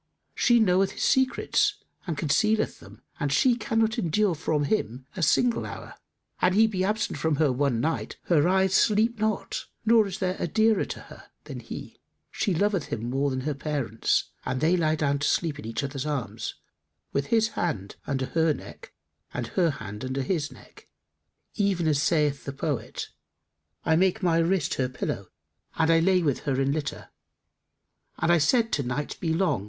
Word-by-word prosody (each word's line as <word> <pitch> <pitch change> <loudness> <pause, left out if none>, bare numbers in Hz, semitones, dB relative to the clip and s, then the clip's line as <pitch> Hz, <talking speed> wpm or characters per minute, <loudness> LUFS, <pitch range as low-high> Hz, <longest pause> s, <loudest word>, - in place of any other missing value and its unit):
She 240 -1 +4
knoweth 190 -2 +3
his - - -4
secrets 340 +10 +2 0.3
and 165 -4 -2
concealeth 215 +9 +1
them - - -15 0.2
and 145 - -1
she 240 - +4
cannot 225 -3 0
endure 185 +3 +2
from 155 -1 -1
him 130 - -1
a 185 - -4
single 230 +9 +3
hour.[FN#286] - - -8 0.5
An 180 0 +4
he 220 +3 +6
be 195 -4 -1
absent 215 +2 -1
from 160 -2 +1
her 145 -1 +2
one 130 -2 +1
night, 160 +7 -2
her 165 -2 +3
eyes 190 0 +3
sleep 220 +3 +3
not, 215 -1 -1 0.2
nor 225 -2 +5
is 190 - -5
there 185 -1 -1
a - - -1
dearer 220 +4 +3
to - - -7
her - - -13 0.2
than - - -7
he: - - -9 0.3
she 195 -5 0
loveth 200 -1 +1
him 115 +2 -4
more 140 +2 +1
than 130 -1 -2
her 150 +3 -1
parents 140 -6 -1
and 130 - -2
they 160 +6 +3
lie 155 -3 +2
down 145 -2 0
to 145 - 0
sleep 155 -4 0
in 130 - -7
each 115 +5 -3
other's 135 +1 -4
arms, 140 -6 -3 0.6
with 140 0 0
his 225 -1 +3
hand 140 - -3
under 135 -2 -1
her 160 +1 +1
neck - - -12 0.4
and 120 -2 -3
her 175 -3 +2
hand 110 -6 -6
under 130 +1 -2
his 150 -1 -1
neck, 130 - -16 0.7
even 195 -5 +1
as 145 -2 +2
saith 150 -4 +1
the 140 - -3
poet, 140 0 -4 0.8
'I 160 -1 +3
made 190 +3 +2
my 165 -2 +3
wrist 170 -1 +1
her 130 -1 -1
pillow 130 - -4 0.5
and 160 0 +3
I 165 - +5
lay 180 +1 +3
with 145 -5 +1
her 135 -1 +1
in 135 0 +2
litter; 150 0 -4 0.5
* - - -48
And 170 - +2
I 175 - +5
said 230 - +3
to 145 - +1
Night 135 +3 -3
'Be 165 - -1
long! 160 - +1
160 Hz, 185 wpm, -26 LUFS, 140-195 Hz, 0.8 s, he